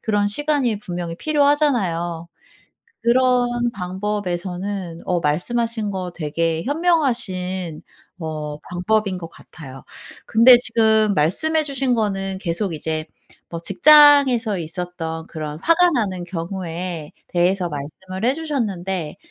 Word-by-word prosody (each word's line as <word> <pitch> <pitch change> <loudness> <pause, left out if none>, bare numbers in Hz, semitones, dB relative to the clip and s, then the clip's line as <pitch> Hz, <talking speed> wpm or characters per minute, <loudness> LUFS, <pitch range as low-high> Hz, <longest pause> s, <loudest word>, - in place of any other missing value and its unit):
그런 205 -2 +1
시간이 270 -3 0
분명히 175 -3 -5
필요하잖아요. 240 - +1 0.8
그런 240 -1 +2
방법에서는 185 -2 -4
어 180 -1 0
말씀하신 220 +7 -1
거 185 -2 -4
되게 165 +1 -1
현명하신 230 - -1 0.4
어 155 -2 -5
방법인 190 +2 -1
것 165 -2 -8
같아요. 135 -7 -12 0.4
근데 240 +2 +7
지금 220 -3 +3
말씀해 310 - +2
주신 270 -3 0
거는 195 -3 -1
계속 180 0 -2
이제 155 0 -3 0.4
뭐 170 - -5
직장에서 285 - +6
있었던 165 -1 -5
그런 155 -1 -6
화가 345 +1 +4
나는 195 - -1
경우에 175 -2 -5 0.2
대해서 180 0 +1
말씀을 185 +8 -6
해주셨는데 200 - -3
190 Hz, 260 characters per minute, -21 LUFS, 170-240 Hz, 0.8 s, 근데